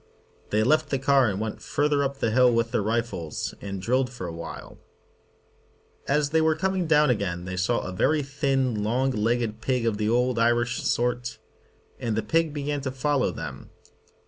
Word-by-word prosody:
They 105 +1 +2
left 155 +5 +2
the 135 - +1
car 135 -2 +3
and 100 -1 -3
went 110 0 -4
further 145 0 +1
up 140 0 -2
the 115 - 0
hill 125 +1 +5
with 115 0 +1
their - - +1
rifles, 110 -7 -2
and 100 -1 -5
drilled 125 +6 +1
for 125 -7 -7
a 85 - -5
while. 85 0 -8 1.3
As 145 0 +1
they 160 0 +3
were 160 0 +3
coming 185 +1 -1
down 150 -3 +4
again 90 -6 -2
they 95 0 -4
saw 95 +6 +1
a 95 - -5
very 150 +11 +1
thin, 135 -4 0
long 125 +5 +1
legged 115 -1 -1
pig 125 -1 0
of 110 -3 0
the 105 0 +1
old 125 0 +2
Irish 120 +1 +2
sort, 125 0 -1 0.6
and 115 -2 -2
the 110 - -1
pig 165 -1 +1
began 145 0 -3
to 135 - -3
follow 135 +1 +1
them. - - -7
125 Hz, 185 wpm, -26 LUFS, 110-140 Hz, 1.3 s, hill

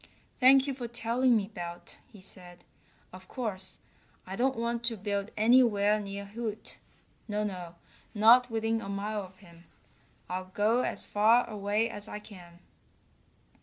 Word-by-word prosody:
"Thank 265 +1 +7
you 280 - -2
for 250 -2 -6
telling 235 +1 +2
me, 200 -1 -3
Belt," 175 -4 -8
he 210 -4 -14
said. 180 -2 -11 0.5
"Of 185 0 -12
course, 190 -7 -3 0.5
I 190 - -6
don't 260 +3 +1
want 235 0 -2
to 230 -1 +2
build 200 0 -3
anywhere 215 -2 +4
near 200 0 -6
Hoot. 215 +1 -6 0.5
No, 210 -1 -1
no, 180 -4 -5 0.4
not 235 +4 +6
within 225 0 -1
a 195 - -7
mile 205 +1 -3
of 185 -1 -12
him. 170 -3 -17 0.6
I'll 185 +1 -4
go 220 +4 +3
as - - -2
far 225 +4 +4
away 210 +1 0
as 210 -2 -8
I - - -6
can." 180 -5 -13
210 Hz, 150 wpm, -29 LUFS, 195-235 Hz, 0.6 s, Thank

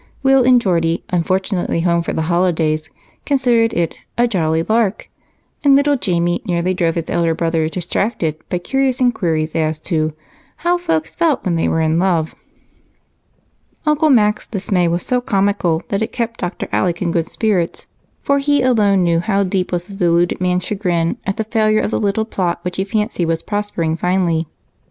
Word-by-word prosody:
Will 270 -1 +5
and 250 0 +5
Geordie, 170 -6 0
unfortunately 180 0 0
home 170 0 +2
for 170 - -3
the 160 - -1
holidays, 160 -2 0 0.3
considered 240 -5 +2
it 170 -1 -1 0.2
"a 240 +1 +3
jolly 165 -6 0
lark," 220 0 0 0.6
and 280 -1 +6
little 285 +1 +3
Jamie 175 -4 0
nearly 180 -2 0
drove 170 -3 0
his 165 -2 -3
elder 165 -1 +1
brother 165 -1 0
distracted 175 -1 -2
by 180 - 0
curious 265 +7 0
inquiries 165 -11 0
as 155 -1 0
to 155 -3 -1 0.5
"how 350 0 +3
folks 160 - -1
felt 330 -5 +1
when 180 - +1
they 165 - +1
were 160 - +1
in 160 +1 +1
love." 170 -4 +1 1.5
Uncle 305 +1 +3
Mac's 210 -6 +3
dismay 190 -3 0
was 170 +1 -1
so 250 -1 +1
comical 195 -7 0
that 200 +1 -1
it 220 - -2
kept 230 -1 -3
Dr. 175 0 -4
Alec 175 -2 0
in 170 - 0
good 165 -1 0
spirits, 195 -7 -1 0.4
for 280 0 +2
he 285 -1 +2
alone 205 -7 +3
knew 170 -1 +2
how 200 +2 +1
deep 185 -1 -1
was 175 -1 -2
the 200 - -11
deluded 175 -1 +1
man's 180 0 0
chagrin 175 -5 -1
at 195 - -1
the 220 - 0
failure 215 -1 +2
of - - -2
the - - 0
little 210 +1 0
plot 180 -5 -1
which 180 0 -4
he 190 - +1
fancied 210 -3 -1
was 165 0 -1
prospering 205 -6 -2
finely. 170 -2 0
185 Hz, 175 wpm, -18 LUFS, 170-220 Hz, 1.5 s, and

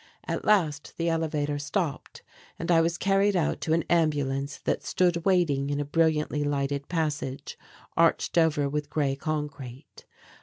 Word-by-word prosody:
At - - -2
last 160 -9 +1
the 170 0 0
elevator 150 -3 -1
stopped 155 0 -3 0.3
and 165 +1 -2
I 165 -1 +5
was 170 +1 0
carried 195 +2 +2
out 170 -4 0
to 160 - 0
an 165 0 +2
ambulance 145 -4 0
that - - 0
stood 175 -2 +1
waiting 160 -8 +2
in 145 0 -1
a 145 - -1
brilliantly 150 -1 +1
lighted 140 -1 -1
passage 145 -5 -3 0.4
arched 165 0 +2
over 155 -4 +3
with 145 +1 -3
grey 140 -3 0
concrete. 140 -4 -6
150 Hz, 150 wpm, -27 LUFS, 145-165 Hz, 0.4 s, I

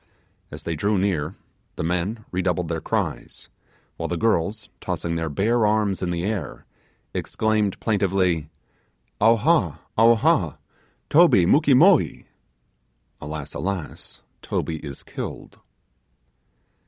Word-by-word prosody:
As - - -9
they 85 - -3
drew 100 +7 +1
near, 90 -4 -1 0.4
the - - -4
men 90 +7 -2
redoubled 90 -2 -1
their 80 -1 -2
cries, - - -3 0.5
while - - -3
the 90 - -2
girls, 105 +2 0
tossing 85 -2 -3
their 80 -1 -2
bare 110 +10 +1
arms 105 -2 +1
in 90 - -1
the 85 0 -2
air, 90 -11 -4 0.5
exclaimed 110 -3 0
plaintively, 95 -7 +1 0.7
'Awha! 115 - +3 0.2
awha! 115 0 +3 0.5
Toby 150 - +6
mukee 140 - +4
moee!' 175 +4 +4 1.0
Alas! 75 -1 -6
alas! 80 -7 -5 0.2
Toby 80 - -2
is 70 -3 -8
killed! - - -8
95 Hz, 110 wpm, -23 LUFS, 80-110 Hz, 1.0 s, Toby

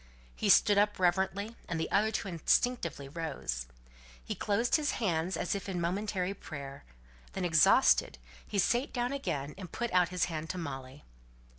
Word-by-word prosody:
He - - -1
stood 205 -1 +6
up 205 0 +2
reverently, 190 +4 0
and 170 -2 -2
the 160 - -3
other 210 +2 +3
two 220 - -3
instinctively 170 - 0
rose. 135 - -4 0.6
He - - -2
closed 220 +4 +1
his 300 -1 +1
hands 180 -4 -1
as - - -1
if 200 -1 -4
in 180 -2 -2
momentary 190 +2 -1
prayer. 140 - -9 0.5
Then 190 - -2
exhausted 165 - +4 0.3
he 205 - -3
sate 240 +8 +1
down 245 +1 -1
again, 150 - -3
and 185 -4 -8
put 235 -3 -3
out 180 -1 +4
his 180 -1 0
hand 160 -2 -5
to 185 - -3
Molly. 135 -4 -7
180 Hz, 165 wpm, -31 LUFS, 160-205 Hz, 0.6 s, stood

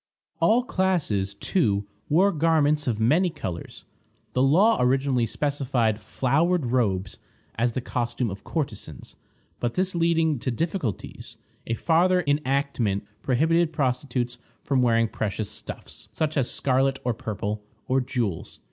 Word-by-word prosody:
All 235 +3 +4
classes, 170 - 0
too, 100 - +1 0.2
wore 185 +7 +4
garments 150 -3 +2
of 115 -3 0
many 155 +12 +3
colors. 95 - -7 0.5
The 125 - +1
law 180 +12 +5
originally 125 -1 +2
specified 125 -5 0
"flowered 155 - +1
robes" 105 -6 0 0.3
as 120 +1 0
the 130 - -2
costume 120 -2 -2
of 100 - -8
courtesans; 135 - -5 0.4
but 120 -1 -2
this 185 0 0
leading 165 -4 +2
to 130 - -2
difficulties, 140 - -3 0.3
a 115 - 0
farther 180 +6 +3
enactment 140 -8 0 0.2
prohibited 160 +6 +2
prostitutes 125 -3 -1 0.2
from 135 -2 +1
wearing 115 -2 +3
precious 105 -1 -3
stuffs, - - -8
such 155 -1 -1
as 135 -4 +1
scarlet 135 0 +1
or 125 - 0
purple, 105 -1 -4 0.2
or 130 +1 +2
jewels. 115 -8 -3
130 Hz, 130 wpm, -25 LUFS, 115-160 Hz, 0.5 s, law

